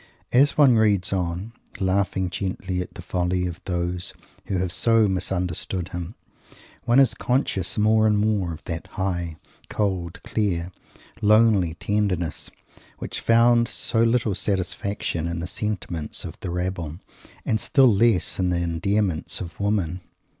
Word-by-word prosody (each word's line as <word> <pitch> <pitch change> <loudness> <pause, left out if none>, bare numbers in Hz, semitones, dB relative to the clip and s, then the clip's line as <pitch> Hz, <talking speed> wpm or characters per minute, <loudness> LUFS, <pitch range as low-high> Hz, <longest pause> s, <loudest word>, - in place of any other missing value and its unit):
As 140 +4 +4
one 135 -6 +6
reads 100 -4 +3
on, 90 +4 -2 0.3
laughing 95 -1 0
gently 95 -1 -3
at 90 - -8
the - - -8
folly 90 0 -1
of 85 -1 -5
those 90 0 -2 0.3
who 95 - -1
have 90 -1 -1
so 115 +2 +3
misunderstood 90 -1 -2
him, 90 +3 -6 0.7
one 120 +3 +4
is 135 - +5
conscious 125 -8 -1
more 110 +1 +4
and 105 -1 +3
more 105 -4 +1
of 80 0 -8
that 85 -1 -5
high, 85 -4 -2 0.3
cold, 90 -4 -2
clear, 90 -5 -1 0.5
lonely 105 -5 +4
tenderness, 95 -4 -1 0.5
which - - -5
found 115 +1 +4
so 115 -1 0
little 115 -2 +2
satisfaction 95 -3 -2
in 85 0 -3
the 85 - -3
sentiment 90 -5 -4
of - - -7
the - - -5
rabble 90 -3 -3 0.5
and 110 - +1
still 130 -1 +4
less 105 -3 +2
in 90 -1 +1
the 90 - +1
endearments 85 +1 -1
of 85 -3 -8
women! 100 -4 0
95 Hz, 140 wpm, -24 LUFS, 90-110 Hz, 0.7 s, one